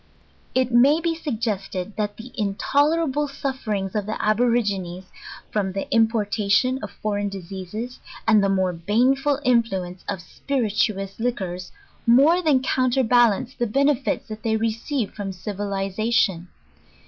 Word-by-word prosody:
It 255 -1 +2
may 270 +6 +5
be 335 0 0
suggested 215 - -3
that 205 -1 -2
the 245 +3 -10
intolerable 290 +8 +1
sufferings 225 -9 -3
of 210 -2 -2
the 215 - -3
Aborigines, 210 -5 +1 0.5
from 195 -3 -1
the 195 - -3
importation 225 +2 +2
of 210 - -5
foreign 205 0 -2
diseases, 195 +5 -7 0.3
and 215 -2 +5
the 195 - +2
more 190 -2 +1
banetiil 255 - +2
influence 195 -7 +1
of 200 - -2
spirituous 210 -2 -2
liquors, 190 -7 -3 0.4
more 285 +9 +6
than 290 -6 +3
counterbalance 245 -2 +2
the 240 -3 -1
benefits 275 +3 +1
ihat 215 0 -6
they 220 0 +1
receive 230 +2 -2
from 205 -2 -5
civiliza 195 +2 -3
tion. 180 -6 +2
220 Hz, 125 wpm, -23 LUFS, 195-255 Hz, 0.5 s, more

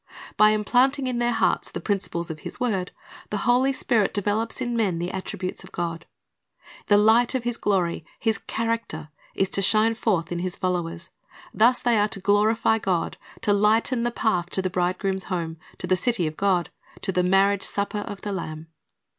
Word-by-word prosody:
By 215 0 +6
implanting 250 +6 +2
in 250 -2 -1
their 240 0 +2
hearts - - +1
the - - -5
principles 170 -5 -2
of 155 - -8
His - - -7
word, 200 -7 -1 0.4
the 205 -1 -3
Holy 250 +2 +4
Spirit 235 -5 +1
develops 210 +4 -1
in 240 -2 -2
men 200 -7 +1
the 175 +2 -3
attributes 185 -1 -5
of - - -14
God. 170 -1 -4 0.8
The 205 - +5
light 225 +5 +4
of 255 - -1
His 240 0 -1
glory 180 -7 0
— - - -34
His 220 0 +2
char 230 0 0
acter 155 -9 -8
— - - -30
is 195 - +1
to 195 - +1
shine 215 +4 +4
forth 190 -8 -1
in 175 - -2
His 180 0 -3
followers. 175 -2 -3 0.4
Thus 240 +3 +3
they 235 -3 +3
are 205 - +3
to 195 - -4
glorify 215 +3 +2
God, 185 -5 -1 0.2
to 205 - +2
lighten 220 +4 +2
the 240 - +1
path 200 -7 0
to 190 - -1
the 185 - -1
Bridegroom's 185 +1 -1
home, 165 -3 -3 0.2
to - - -5
the 185 - +2
city 190 -1 0
of 155 0 -3
God, 185 -3 +1 0.3
to - - -1
the 180 0 +1
marriage 195 +2 +3
supper 205 +1 -2
of 205 -1 -7
the 205 - -3
Lamb. 160 -3 -6
205 Hz, 195 wpm, -24 LUFS, 180-225 Hz, 0.8 s, By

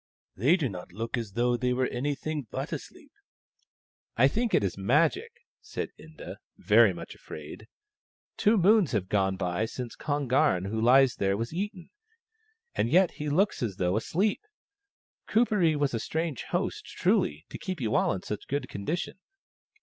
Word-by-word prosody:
" - - -82
They 140 - +4
do 155 -7 0
not 90 -5 -8
look 115 +6 -4
as 115 -5 -5
though 120 +2 +2
they 125 +1 0
were 130 +1 +1
anything 145 +2 -3
but - - -4
asleep." - - -9 0.6
" - - -43
I 130 +3 +6
think 230 - 0
it - - +3
is 95 - -1
Magic," 155 - +2 0.3
said 425 - -5
Inda, - - -10 0.2
very - - +5
much - - -8
afraid. - - -10 0.3
" - - -78 0.3
Two 220 +1 +4
moons 195 - +4
have 95 -4 -1
gone 95 -2 +1
by 90 +3 -1
since 120 0 -6
Kon 145 -2 -2
garn, 125 -8 +3
who 110 +3 -2
lies 130 +2 +5
there, 100 0 +1
was 115 +6 -4
eaten, 195 0 -5 0.8
and - - 0
yet 180 +4 +4
he 150 0 -5
looks 190 +8 +1
as 110 -6 -2
though 90 0 0
asleep. 185 - 0 0.9
Kuperee 210 -8 +3
was 145 -3 0
a 115 - 0
strange 160 0 -3
host, - - -2
truly, 75 +3 0
to - - -7
keep 185 -3 -4
you 110 -4 -1
all - - +3
in 95 - -3
such 105 - -5
good 140 -2 -2
condition 160 - -4
130 Hz, 175 wpm, -28 LUFS, 110-170 Hz, 0.9 s, I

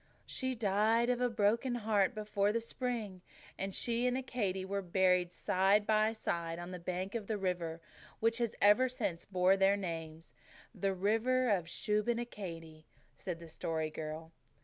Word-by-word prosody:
"She 260 0 -2
died 220 +3 +2
of 245 0 -1
a 250 - +3
broken 230 +3 +1
heart 210 -4 +1
before 210 -1 0
the 230 - 0
spring, 230 -5 -4 0.3
and 195 +1 -3
she 235 +5 0
and 250 +1 +1
Accadee 210 -8 -2
were 200 +1 -2
buried 180 -1 +2
side 195 +3 +2
by 215 0 +3
side 170 -6 -3
on 175 +1 -7
the 180 - -6
bank 180 +3 -3
of 225 -4 -4
the 220 - -1
river 175 -4 -2 0.4
which 230 +1 +1
has 235 -2 -1
ever 210 +6 +5
since 205 -9 -3
borne 185 0 +3
their 195 +1 +4
names 165 -3 -6 0.4
the 195 -1 -1
river 225 +6 +2 0.2
Shubenacadie," 200 -7 -3 0.3
said 175 -3 -5
the 170 - -10
Story 160 -1 -3
Girl. 155 +1 -6
200 Hz, 155 wpm, -34 LUFS, 180-230 Hz, 0.4 s, ever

